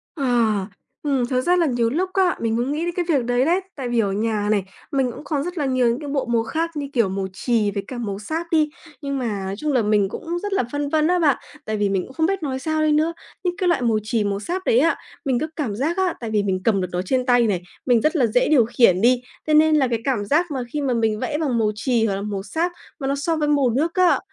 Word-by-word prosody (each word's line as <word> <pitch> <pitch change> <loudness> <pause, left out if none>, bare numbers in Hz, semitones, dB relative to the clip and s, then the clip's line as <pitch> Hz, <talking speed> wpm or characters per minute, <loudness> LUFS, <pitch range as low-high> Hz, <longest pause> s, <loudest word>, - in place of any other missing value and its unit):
Ờ, 280 -4 -2 0.8
ừm, 275 -4 +1
thực 255 +1 0
ra 355 +7 +3
là 345 - +3
nhiều 240 -5 +1
lúc 355 +9 -1
á, 375 -2 +3
mình 225 -1 0
cũng 245 +4 -1
nghĩ 310 +3 -1
đến 345 - -2
cái 355 -2 -1
việc 275 -7 +2
đấy 245 +2 +2
đấy, 345 +4 +3 0.2
tại 265 -4 -4
vì 240 -1 +1
ở 200 -3 +1
nhà 210 0 -1
này, 205 -2 +2 0.3
mình 265 -3 +1
cũng 235 - -10
có 290 -3 -1
rất 355 +1 -5
là 295 - 0
nhiều 255 -2 +2
những 235 +2 +1
cái 290 - -6
bộ 275 -1 -1
màu 235 -2 +1
khác 325 +8 -2
như, 285 -2 -3
kiểu, 230 -6 +2
màu 190 0 -2
chì 215 +1 0
với 200 0 -3
cả 255 - -6
màu 205 -4 -4
sáp 320 +10 -4
đi, 310 -2 +3 0.3
nhưng 280 -1 -2
mà 225 -6 -2
nói 195 +1 -3
chung 300 +4 -1
là 250 - +3
mình 210 -2 +2
cũng 340 - -4
rất 410 - -2
là 390 - +2
phân 290 0 -2
vân 310 +1 +2
á 360 +1 +2
bạn, 295 -6 +3 0.3
tại 215 0 -2
vì 205 -1 +1
mình 195 -2 0
cũng 260 - -12
không 320 +3 +1
biết 385 -1 -1
nói 265 -2 -2
sao 315 +2 -1
đây 310 - +3
nữa. 310 +2 +2 0.3
Những 355 0 -1
cái 375 -3 0
loại 340 -7 +2
màu 230 -2 +2
chì, 215 0 0
màu 200 -1 -1
sáp 350 - -3
đấy 230 - +4
á, 330 +4 +3 0.3
mình 260 -3 +1
cứ 310 - -2
cảm 250 -10 -2
giác 305 - -1
á, 375 -2 +1
tại 230 - -5
vì 210 -2 +2
mình 185 -2 -1
cầm 200 -3 +2
được 180 - -1
nó 180 - -1
trên 255 +7 0
tay 245 -2 +4
này, 190 -5 0 0.2
mình 245 -3 +4
rất 310 +7 +1
là 270 -6 +4
dễ 235 +3 +2
điều 265 -7 +5
khiển 215 -6 +3
đi, 245 +2 +4 0.3
thế 305 - +2
nên 310 0 +5
là 275 -4 +3
cái 230 -2 -1
cảm 240 -7 0
giác 315 - +1
mà 270 - -2
khi 300 - -1
mà 260 -3 0
mình 225 -2 0
vẽ 295 +5 -2
bằng 280 -7 0
màu 215 -2 +2
chì 225 0 +1
hoặc 200 - 0
là 195 - -4
màu 200 -2 -4
sáp 325 - -1 0.3
mà 270 - -3
nó 275 - +1
so 325 +4 -1
với 300 -1 0
màu 285 -4 +3
nước 300 +8 0
á 365 -2 +4
260 Hz, 295 wpm, -22 LUFS, 225-310 Hz, 0.8 s, điều